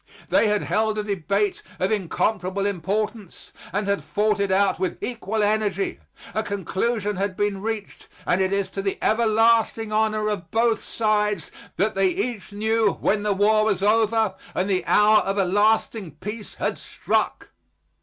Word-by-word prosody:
They - - +4
had 210 0 +1
held 215 0 0
a 210 - -1
debate 200 0 -1 0.2
of 185 +3 0
incomparable 195 -1 -1
importance 200 +2 -3 0.2
and 205 +3 -1
had 200 0 0
fought 210 0 0
it 200 -1 0
out 195 +1 +2
with 185 - -2
equal 225 -3 -2
energy. 205 -2 0 0.3
A 220 - 0
conclusion 205 +1 -2
had 195 -1 -2
been 205 -2 -1
reached 220 -1 -5 0.2
and 180 - +2
it 190 0 +1
is 200 -1 0
to 195 - -4
the 195 0 -2
everlasting 225 0 +2
honor 215 0 +1
of 205 -4 -3
both 230 0 +1
sides 210 -2 0 0.3
that 210 +3 +1
they 195 0 +2
each 205 +3 -3
knew 220 0 +1
when 205 +1 0
the 205 -1 +1
war 215 +2 +3
was 200 -3 0
over 220 -1 +3 0.2
and 185 - 0
the 190 -2 0
hour 210 +1 +5
of 195 +1 -2
a 195 - +3
lasting 205 -3 +1
peace 210 +6 -7
had - - -2
struck. - - -2
210 Hz, 165 wpm, -23 LUFS, 195-220 Hz, 0.3 s, hour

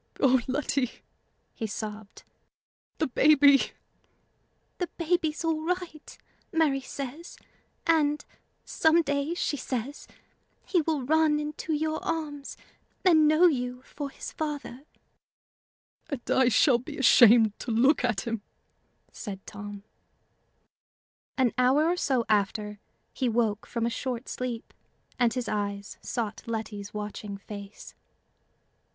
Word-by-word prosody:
"O 260 -2 +4
Letty!" 265 -2 0 0.6
he 225 - -4
sobbed 210 0 -7 0.7
"the 315 - +1
baby!" 280 0 +5 1.1
"The 355 - -1
baby's 335 -2 0
all 320 -1 0
right, 350 -3 -4 0.3
Mary 310 -6 +2
says; 280 +5 -7 0.5
and, 300 -3 +2 0.4
some 325 +1 +3
day, 285 +3 -1
she 295 - -1
says, 260 +2 -4 0.6
he 355 - +2
will 310 -3 -1
run 310 +2 +3
into 300 +2 -4
your 310 +1 -1
arms, 295 -4 -4 0.5
and 315 -4 +6
know 310 +4 +5
you 250 -5 0
for 285 0 -6
his - - -8
father." 290 -3 -5 1.2
"And 275 -5 -4
I 260 -2 +4
shall 245 +1 +4
be 250 - -8
ashamed 230 -4 +6
to - - -6
look 250 +6 +3
at 240 -6 +1
him!" 230 -1 -3 0.7
said 195 -4 -7
Tom. 205 0 -8 1.5
An 255 -3 +2
hour 265 +5 +4
or 345 +2 +2
so 255 -8 +1
after, 210 0 0 0.3
he 255 -3 0
woke 220 -2 0
from 235 -1 -2
a 235 - 0
short 250 0 -4
sleep, 245 -2 -5 0.5
and 240 -1 +3
his 250 -3 -2
eyes 200 -1 -3
sought 220 -3 -3
Letty's 215 -3 -4
watching 210 -1 -6
face. 200 0 -10
260 Hz, 120 wpm, -28 LUFS, 225-305 Hz, 1.5 s, and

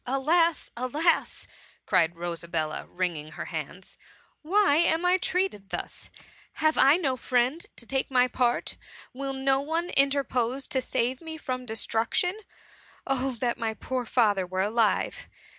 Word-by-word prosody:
^' - - -46
Alas! 315 +6 +2
alas 295 +8 0 0.2
!" - - -31
cried 165 0 +2
Rosabella, 170 -2 -3
wringing 165 -4 -3
her - - -6
hands, - - -7
*^ - - -26 0.4
why 375 -1 +3
am 335 +1 +2
I 360 +1 +4
treated 365 - -1
thus? - - -6 0.4
Have 310 0 +2
I 275 +4 +6
no 275 -8 0
friend 255 +6 0
to 235 - -7
take 265 +2 -1
my 250 -1 +4
pa:t? 245 -1 0 0.4
Will 270 +1 -4
no 270 0 +2
one 325 +4 -2
interpose 270 -2 +1
to 260 - 0
save 250 +1 -1
me 320 -1 -7
from 255 -4 -4
destruction? 225 - 0 0.7
Oh 270 0 0
that 240 -2 0
my 225 -1 -2
poor 250 +1 -3
father 205 -7 +2
were 185 +1 -1
alive 225 - 0
260 Hz, 150 wpm, -27 LUFS, 225-310 Hz, 0.7 s, I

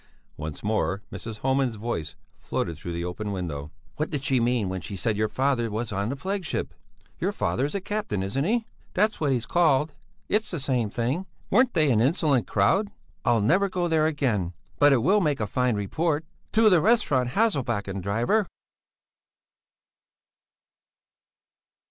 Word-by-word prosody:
Once 75 0 -6
more 105 -2 0
Mrs. 110 -2 -7
Homan's 130 -2 +1
voice 85 -8 -4 0.2
floated 85 - -2
through 85 +3 -7
the 85 +1 -3
open 105 +4 -4
window: 80 -6 -4 0.3
"What 155 - -1
did 145 -3 -3
she 130 -1 +2
mean 120 -3 +1
when 95 0 -3
she 85 +5 -6
said 105 +3 0
your 110 +1 +1
father 130 -1 0
was 110 +1 -3
on 100 +1 -1
the 135 - -2
flagship? 190 +4 -3 0.5
Your - - 0
father 90 +11 0
is 145 - -4
a 200 - -1
captain, 195 - -2
isn't 105 +9 -1
he?" 225 +6 +1 0.3
"That's 210 +1 +1
what 145 -3 +2
he's 125 -3 0
called. 155 -1 +2 0.3
It's 215 +1 +1
the 170 - -3
same 125 -5 0
thing. 130 - -2 0.2
Weren't 255 -1 +4
they 155 -3 +4
an 110 -2 +3
insolent 140 -1 +2
crowd? 190 - +2 0.3
I'll 115 -2 +3
never 190 - +3
go 180 -1 -1
there 160 -2 +3
again. 115 - 0 0.3
But 145 0 +6
it 125 -4 +3
will 205 +7 +4
make 150 -5 +1
a 110 - 0
fine 125 +2 +1
report. 155 - -1 0.3
To 220 0 +5
the 180 -6 +6
restaurant 150 - +3
Hasselbacken, 120 - 0
driver!" 115 - +1
130 Hz, 165 wpm, -26 LUFS, 105-165 Hz, 0.5 s, But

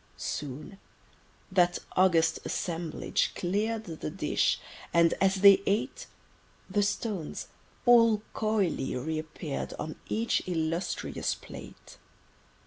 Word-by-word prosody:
Soon 150 +7 -5 0.7
that 180 -2 +3 0.2
august 180 -3 +4
assemblage 165 -2 -2
clear'd 215 +5 -1
The 160 - -5
dish; - - +1 0.3
and—as 170 +3 +3
they 200 -1 +8
ate— 215 - -1 0.6
The 205 +2 +1
stones, 200 -4 -2 0.4
all 230 -3 +6
coyly, 210 -10 0
re 155 +5 -2
appear'd 155 -2 -5
On 155 - -6
each 230 +2 +1
illustrious 165 0 -1
plate. - - -12
185 Hz, 95 wpm, -29 LUFS, 160-205 Hz, 0.7 s, they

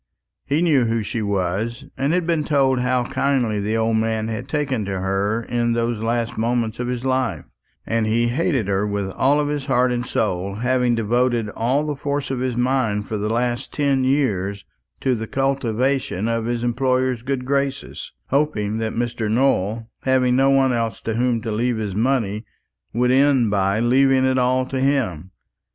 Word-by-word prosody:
He 150 +5 +1
knew 145 -8 +3
who 115 -1 0
she 115 +2 -3
was, 100 +6 -2
and 140 +2 0
had 180 0 +1
been 165 -2 +1
told 135 -3 +2
how 125 0 +1
kindly 125 -5 0
the 105 +2 -1
old 110 0 +1
man 110 0 -1
had 115 +3 -4
taken 140 -7 -1
to 95 -1 -3
her 100 +4 -1
in 120 0 0
those 115 -1 -1
last 115 0 -1
moments 115 -1 -1
of 125 - -2
his 125 0 -3
life; 130 - -1 0.4
and 115 -1 0
he 120 +2 +2
hated 135 - 0
her 100 +1 0
with 100 -2 -2
all 145 +7 +2
his 145 -2 -3
heart 125 -2 +2
and 120 0 -1
soul, 100 -5 -2
having 125 +1 +1
devoted 120 0 +1
all 130 +8 0
the 150 -1 -2
force 140 0 -3
of 130 - -2
his 125 -2 -2
mind 120 -5 0
for 110 - -3
the 105 +1 -2
last 120 +1 -1
ten 140 -3 +1
years 100 -8 0 0.4
to 130 - +2
the 110 -2 -3
cultivation 135 -4 0
of 115 -1 -1
his 120 0 -2
employer's 130 0 0
good 130 0 -3
graces, 140 0 -2 0.2
hoping 115 -7 0
that 110 -1 -2
Mr. 115 -2 -2
Nowell, 115 -2 +1
having 130 -1 +2
no 135 +1 +4
one 135 -1 +3
else 115 -1 -2
to 115 - -2
whom 120 0 +1
to 115 0 -4
leave 120 +2 0
his 105 -3 -3
money, 110 -2 0 0.5
would 125 +2 +1
end 130 -4 +3
by 100 +1 +1
leaving 130 +2 +3
it 130 0 +2
all 130 +1 +2
to 130 0 -3
him. 125 - 0
120 Hz, 180 wpm, -21 LUFS, 110-130 Hz, 0.5 s, no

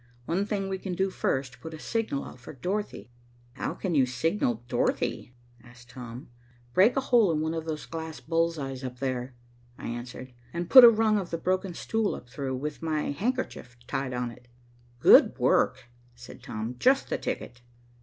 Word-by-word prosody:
"One 190 +7 0
thing 200 -3 -1
we 190 0 -3
can 185 -2 -4
do 190 +1 0
first, 130 -6 -2
put 160 0 -7
a - - -11
signal 220 -8 -2
out - - -11
for 120 - -10
Dorothy." 180 -1 -4 0.4
"How 130 - -4
can 185 -3 -3
you 135 -4 +4
signal 130 - 0
Dorothy?" 125 0 -1 0.3
asked 120 0 -16
Tom. 125 0 -9 0.5
"Break 205 - +5
a - - +3
hole 235 -8 +4
in 155 - 0
one 160 +1 -1
of 160 -1 -4
those 155 -2 -4
glass 160 -3 -6
bull's 165 +5 0
eyes 135 -2 -5
up 125 -1 -5
there," 130 -1 -3 0.4
I - - -6
answered, 125 +2 -7 0.2
"and 170 0 -4
put 260 -2 +12
a 240 - +12
rung 220 -2 +3
of 185 - -5
the 165 - -2
broken 185 +1 -1
stool 225 -2 -1
up 125 - -11
through, 135 -1 -3
with 150 +4 -5
my 155 -3 -1
handkerchief 205 - -3
tied 135 -1 -3
on 125 -1 -2
it." 125 +1 -16 0.5
"Good - - +7
work," - - +2 0.3
said 120 +1 -12
Tom. 115 +1 -5
"Just 270 +1 +3
the - - 0
ticket." 120 0 -5
150 Hz, 185 wpm, -28 LUFS, 125-190 Hz, 0.5 s, put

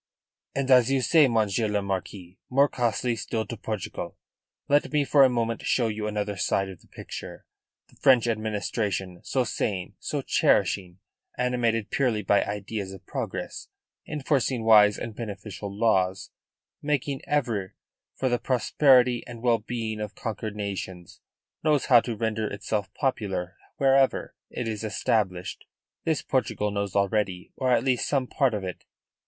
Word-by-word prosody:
"And, 135 -1 0
as 125 -1 +6
you, 135 - +3
say, 155 +2 +5
Monsieur 110 -2 +1
le 105 -1 0
Marquis, 95 -1 -5
more 140 +3 +4
costly 120 -1 0
still 110 0 -3
to 115 - -6
Portugal. 110 -2 -5 0.5
Let 145 +1 +2
me 150 -1 +2
for 140 0 +6
a 130 - +6
moment 115 -2 -1
show 120 -3 +1
you 105 0 -3
another 105 -1 -2
side 95 +1 0
of 95 -3 -11
the - - -23
picture. - - -9 0.4
The - - -24
French 125 -4 +5
administration, 105 -4 -2
so 130 - 0
sane, 95 -5 -2
so - - -3
cherishing, 90 -2 +2 0.4
animated 120 -3 0
purely 120 -6 +1
by 100 +2 +3
ideas 100 -1 -4
of 95 -2 -12
progress, - - -5 0.4
enforcing 135 -5 0
wise 105 -2 +6
and 115 - -6
beneficial 100 -2 -6
laws, 95 -3 +1 0.5
making 145 -2 -1
ever 115 -10 -1 0.4
for 130 - -1
the 120 -1 +1
prosperity 125 0 +3
and 120 -1 -9
well 120 -2 +3
being 110 -1 -4
of 105 -1 -5
conquered 110 -2 -4
nations, 95 -3 -6 0.4
knows 150 -3 +2
how 120 -3 +7
to 115 0 -4
render 110 0 -1
itself 100 0 -3
popular 100 -9 -2 0.2
wherever 135 -1 +3 0.2
it 120 - -4
is 110 -1 -3
established. 100 -4 -1 0.4
This - - 0
Portugal 105 0 0
knows 100 -1 -3
already 100 -2 0
or 130 - -1
at - - +3
least 130 -3 +1
some 135 -3 +1
part 125 -2 +1
of 100 - -4
it. 90 -1 -6
110 Hz, 150 wpm, -26 LUFS, 100-125 Hz, 0.5 s, how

